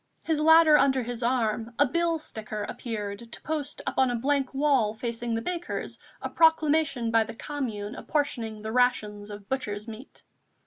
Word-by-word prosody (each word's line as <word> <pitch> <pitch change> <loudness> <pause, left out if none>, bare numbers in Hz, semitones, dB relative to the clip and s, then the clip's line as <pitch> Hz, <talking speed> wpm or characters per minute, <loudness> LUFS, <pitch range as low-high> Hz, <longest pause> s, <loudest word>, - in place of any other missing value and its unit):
His 320 -2 0
ladder 315 -1 +7
under 265 -2 +3
his 240 0 -5
arm, 235 -1 0
a 285 - +5
billsticker 300 -9 -2
appeared 215 -1 -5
to - - -7
post 300 -2 -4
up - - -2
on 260 -1 +4
a 245 - 0
blank 270 +2 0
wall 270 -6 +2
facing 235 0 -3
the 225 - -2
baker's 350 +2 -4 0.2
a - - -1
proclamation 310 -6 +3
by 225 -1 +4
the 225 +1 -9
Commune 230 -7 -4
apportioning 230 -8 -2
the 220 - -4
rations 215 -4 +1
of 205 -1 -9
butcher's 210 -5 -3
meat. 225 +4 -10
245 Hz, 165 wpm, -27 LUFS, 220-290 Hz, 0.2 s, ladder